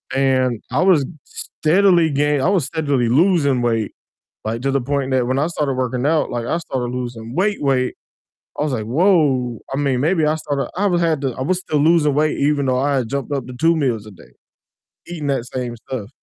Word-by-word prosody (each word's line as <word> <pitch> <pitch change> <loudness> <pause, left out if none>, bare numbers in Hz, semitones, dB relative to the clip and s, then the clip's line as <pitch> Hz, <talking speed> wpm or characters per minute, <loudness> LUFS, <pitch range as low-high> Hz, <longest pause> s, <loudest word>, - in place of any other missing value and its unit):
and, 130 -3 +1
I 135 - +1
was 185 -5 +5 0.2
st - - -8 0.2
steadily 175 0 +4
gain 145 0 +1
I 165 - +2
was 190 -8 +2
steadily 140 -5 0
losing 140 -2 +3
weight, 115 -3 0 0.5
like, 115 +2 -3
to 135 - +1
the 140 0 +1
point 135 +1 -2
that 130 -2 +1
when 130 +2 0
I 150 - +1
started 150 -5 -1
working 125 0 -1
out, 155 0 +2
like, 120 -1 -3
I 160 - 0
started 130 -7 -3
losing 120 -2 -5
weight, 200 +3 0
weight. 130 -3 +1 0.6
I - - 0
was 150 -2 -1
like, 110 -4 -2
"Whoa," 135 - +2 0.2
I - - -1
mean, 140 -3 0
maybe 160 +3 +2
I 155 +1 +2
started 145 -3 -3
I 205 - +1
was 175 -3 +1
had 160 -4 +1
to 135 - -1
I 130 - -4
was 180 +7 0
still 155 -5 -1
losing 155 -2 +3
weight 150 +1 +1
even 145 0 +1
though 130 -1 +1
I 140 +1 +1
had 120 -3 -2
jumped 140 +1 -3
up 135 -3 -2
to 130 - -8
2 165 0 +4
meals 120 -8 -1
a - - -10
day, 90 - -17 0.7
eating 165 -4 -5
that 135 -4 0
same 125 -2 -4
stuff. 115 -2 -6
140 Hz, 220 wpm, -20 LUFS, 125-155 Hz, 0.7 s, was